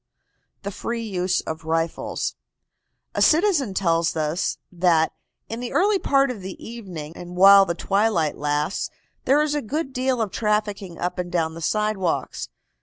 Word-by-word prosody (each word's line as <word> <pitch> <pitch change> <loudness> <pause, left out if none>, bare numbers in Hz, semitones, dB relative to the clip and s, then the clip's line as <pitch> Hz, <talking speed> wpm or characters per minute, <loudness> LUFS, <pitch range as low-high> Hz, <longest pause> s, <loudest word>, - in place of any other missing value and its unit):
THE 200 - -3
FREE 230 +3 -4
USE 185 -3 0
OF 160 0 -6
RIFLES. 165 +1 -1 0.8
A - - -1
citizen 315 - +3
tells 165 -3 +1
us 155 +3 -1
that 170 -3 +2 0.3
"in 225 - -5
the 245 0 -5
early 400 +2 +3
part 275 -4 +3
of 220 -6 -7
the 190 0 -7
evening, 180 -9 -8
and 175 0 -9
while 195 +1 +8
the 170 - -1
twilight 195 -5 +1
lasts, 150 +4 -1 0.4
there 285 +3 +4
is 300 -1 -1
a 295 - 0
good 280 +4 -3
deal 255 0 0
of 215 -4 -1
trafficking 210 -4 -1
up 180 +1 -3
and 175 -1 -3
down 165 -3 0
the 165 - -8
sidewalks. 210 -1 -1
195 Hz, 160 wpm, -23 LUFS, 170-235 Hz, 0.8 s, while